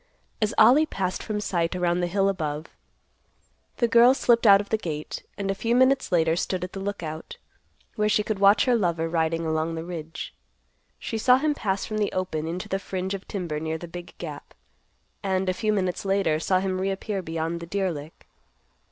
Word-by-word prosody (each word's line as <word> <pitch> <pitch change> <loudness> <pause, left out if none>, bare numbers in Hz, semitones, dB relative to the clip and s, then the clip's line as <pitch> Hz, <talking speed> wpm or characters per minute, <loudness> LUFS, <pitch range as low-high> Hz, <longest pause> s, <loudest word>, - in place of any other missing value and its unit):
As 215 - +2
Ollie 265 +8 +6
passed 185 -6 -2
from 215 -2 -3
sight 175 -4 -1
around 175 -1 +1
the 175 - 0
hill 195 +2 +1
above, 155 -5 -2 1.1
the 235 - +2
girl 235 +3 +6
slipped 235 -3 +3
out 200 -1 +8
of 205 - -5
the 220 - +2
gate, 155 -6 -5 0.2
and 195 -1 -1
a - - 0
few 230 +4 0
minutes 260 -1 +3
later 165 -2 +3
stood 180 +1 -2
at 180 - -6
the 195 - -5
Lookout, 170 -6 -5 0.6
where 210 0 +2
she 210 0 +2
could 210 -2 -3
watch 200 +1 +5
her 250 - +3
lover 170 -7 +1
riding 165 0 0
along 160 +1 -1
the 160 - -4
ridge. 165 -2 -7 0.6
She 225 - -4
saw 250 +3 +5
him 300 +2 +1
pass 195 -8 -2
from 215 0 -3
the 205 - 0
open 160 -4 -2
into 175 +2 -4
the 195 - -1
fringe 190 0 -4
of 195 -1 -6
timber 170 -6 -3
near 160 +1 -3
the 175 - -8
big 175 +1 -9
gap; - - -8 0.7
and, 190 -1 0
a 185 - +2
few 215 +3 0
minutes 185 -4 -1
later, 195 -6 +1
saw 185 +3 +2
him 185 -1 -2
reappear 195 +1 -2
beyond 165 0 -3
the 170 - -8
deer 190 0 0
lick. 150 0 -9
185 Hz, 200 wpm, -25 LUFS, 165-210 Hz, 1.1 s, out